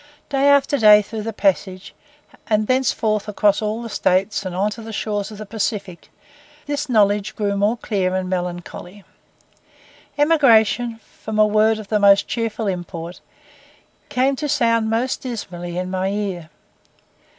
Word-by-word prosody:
Day 280 Hz, 0 st, +2 dB
by 285 Hz, 0 st, +7 dB, 0.2 s
day 210 Hz, -1 st, +7 dB
throughout 215 Hz, +1 st, -6 dB
the 225 Hz, -, -2 dB
passage, 195 Hz, -2 st, -1 dB, 0.5 s
and 215 Hz, -1 st, +1 dB
thenceforward 225 Hz, -4 st, 0 dB
across 210 Hz, 0 st, +2 dB
all 215 Hz, +2 st, -3 dB
the 230 Hz, -, -6 dB
States, 195 Hz, +1 st, 0 dB
and 185 Hz, -2 st, -5 dB
on 200 Hz, +3 st, 0 dB
to 225 Hz, -, -8 dB
the 225 Hz, 0 st, -8 dB
shores 205 Hz, -1 st, -3 dB
of 215 Hz, -, -10 dB
the 215 Hz, -, -7 dB
Pacific, 200 Hz, -4 st, -4 dB, 0.6 s
this 290 Hz, 0 st, -3 dB
knowledge 205 Hz, -3 st, +2 dB
grew 205 Hz, -1 st, -1 dB
more 205 Hz, +4 st, +1 dB
clear 190 Hz, -5 st, -1 dB
and 185 Hz, 0 st, -2 dB
melancholy. 180 Hz, +1 st, -5 dB, 1.1 s
Emigration, 245 Hz, -6 st, +3 dB
from 220 Hz, -1 st, -8 dB
a 215 Hz, -, +6 dB
word 215 Hz, +1 st, +3 dB
of 215 Hz, -2 st, -9 dB
the 215 Hz, -, +1 dB
most 200 Hz, -1 st, +5 dB
cheerful 230 Hz, -1 st, -3 dB
import, 175 Hz, -2 st, -5 dB, 0.9 s
came 265 Hz, +2 st, +1 dB
to 295 Hz, +1 st, -3 dB
sound 230 Hz, -5 st, +2 dB
most 240 Hz, +4 st, -1 dB
dismally 175 Hz, -8 st, -6 dB
in 185 Hz, 0 st, -3 dB
my 185 Hz, 0 st, -1 dB
ear. 195 Hz, -5 st, -3 dB
210 Hz, 150 wpm, -20 LUFS, 195-230 Hz, 1.1 s, by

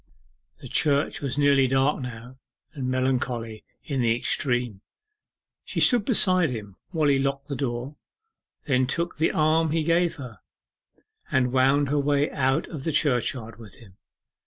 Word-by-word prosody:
The -, -, -9 dB
church 145 Hz, -2 st, +1 dB
was 140 Hz, -1 st, -3 dB
nearly 140 Hz, -2 st, +4 dB
dark 135 Hz, +3 st, +1 dB
now, 125 Hz, +1 st, -9 dB, 0.3 s
and 135 Hz, -4 st, -4 dB
melancholy 125 Hz, -4 st, -2 dB, 0.2 s
in 135 Hz, -3 st, -2 dB
the 115 Hz, -1 st, +2 dB
extreme. 120 Hz, -4 st, -1 dB, 0.8 s
She -, -, -4 dB
stood 240 Hz, -4 st, +5 dB
beside 185 Hz, -, +3 dB
him 105 Hz, -6 st, -7 dB
while 160 Hz, -4 st, 0 dB
he 140 Hz, -1 st, +3 dB
locked 140 Hz, +1 st, -2 dB
the 140 Hz, -, -3 dB
door, 125 Hz, +2 st, -4 dB, 0.7 s
then 130 Hz, -3 st, +1 dB
took 170 Hz, +6 st, -2 dB
the 160 Hz, -, +2 dB
arm 160 Hz, +1 st, +2 dB
he 160 Hz, +1 st, 0 dB
gave 170 Hz, +1 st, +1 dB
her, 125 Hz, -, -10 dB, 0.9 s
and 125 Hz, -1 st, +1 dB
wound 135 Hz, +2 st, +3 dB
her 145 Hz, +1 st, +1 dB
way 145 Hz, +1 st, +1 dB
out 135 Hz, +2 st, 0 dB
of 150 Hz, -5 st, -8 dB
the 160 Hz, -, -1 dB
churchyard 125 Hz, -6 st, 0 dB
with 110 Hz, -4 st, -12 dB
him. 100 Hz, -5 st, -18 dB
135 Hz, 155 wpm, -25 LUFS, 125-150 Hz, 0.9 s, stood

